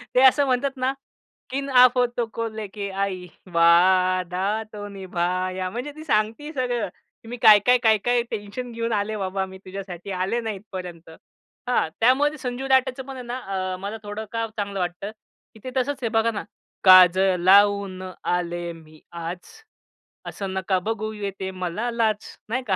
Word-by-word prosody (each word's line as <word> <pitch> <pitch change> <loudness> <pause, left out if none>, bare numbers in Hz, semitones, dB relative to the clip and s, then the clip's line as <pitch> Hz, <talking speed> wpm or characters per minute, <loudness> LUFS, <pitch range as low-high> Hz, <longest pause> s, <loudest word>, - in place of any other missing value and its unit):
ते 250 - +6
असं 275 +2 +6
म्हणतात 270 +1 0
ना, 260 +1 0 0.6
किन 275 +2 -3
आफतों 250 -2 +4
को 230 0 -2
लेके 210 -2 -6
आई, 190 -2 -3 0.3
वादा 185 +4 +3
तो 205 -1 -6
निभाया. 185 -1 -2
म्हणजे 245 +8 -5
ती 310 - -9
सांगते 225 +3 0
सगळं, 245 -4 -1 0.4
की - - -14
मी 245 - -5
काय-काय, 215 +4 +7
काय-काय 225 +2 +3
टेन्शन 215 +4 -5
घेऊन 230 0 -2
आले 210 +1 -1
बाबा, 190 0 -2
मी 190 0 -11
तुझ्यासाठी 190 -1 -7
आले 195 +6 0
ना 225 -1 -3
इथपर्यंत. 185 -5 -8 0.6
हां. 245 -9 +1
त्यामध्ये 280 +6 +3
संजू 260 0 -4
राठेचं 265 0 +2
पण 270 +1 -8
आहे 255 - -7
ना, 240 +1 -4 0.4
अ, - - -5
मला 200 +3 -5
थोडं 210 +1 -5
का 230 0 -1
चांगलं 200 -1 -3
वाटतं, 180 +3 -3 0.4
की 220 - -16
ते 255 - -6
तसंच 265 +1 -1
हे 230 - +1
बघा 225 +1 +3
ना, 210 - -4 0.4
काजळ 185 0 +7
लावून 200 0 +4 0.3
आले 175 -1 -2
मी 155 -1 -16
आज, 170 +1 -5 0.9
असं 195 -2 -5
नका 190 0 0
बघू 215 -1 -2
येते 195 -2 -5
मला 185 +5 -3
लाज. 220 -3 -1
नाही 255 +4 -1
का? 190 - +2
205 Hz, 160 wpm, -24 LUFS, 185-245 Hz, 0.9 s, काय-काय